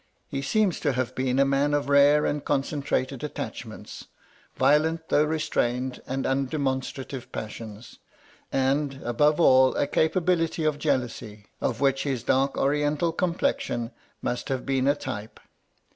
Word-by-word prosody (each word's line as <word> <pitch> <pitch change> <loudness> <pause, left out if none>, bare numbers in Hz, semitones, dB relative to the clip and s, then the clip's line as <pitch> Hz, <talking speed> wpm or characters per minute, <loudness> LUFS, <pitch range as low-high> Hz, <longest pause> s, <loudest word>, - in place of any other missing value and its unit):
He 135 - -4
seems 200 +5 +1
to 145 -3 0
have 125 -1 -2
been 130 0 -1
a 140 - +5
man 140 +2 +2
of 145 - -1
rare 145 +1 +5
and 145 0 -1
concentrated 135 -2 -1
attachments; 150 - -7 0.5
violent, 160 +2 +2
though 150 - +4
restrained 130 -5 -1
and 135 +1 -2
undemonstrative 135 -1 -2
passions; 110 0 -8 0.5
and, 135 +1 0
above 150 +7 +2
all, 130 -5 +5
a - - +1
capability 165 +1 +1
of 155 -1 0
jealousy, 120 -7 -2 0.2
of 120 0 -1
which 135 -1 +2
his 135 -5 -2
dark 135 +2 +1
oriental 150 +3 +1
complexion 175 - -1 0.3
must 125 - -3
have 130 -2 -2
been 135 -1 +1
a 140 - +4
type. 130 -7 -7
140 Hz, 135 wpm, -26 LUFS, 130-150 Hz, 0.5 s, a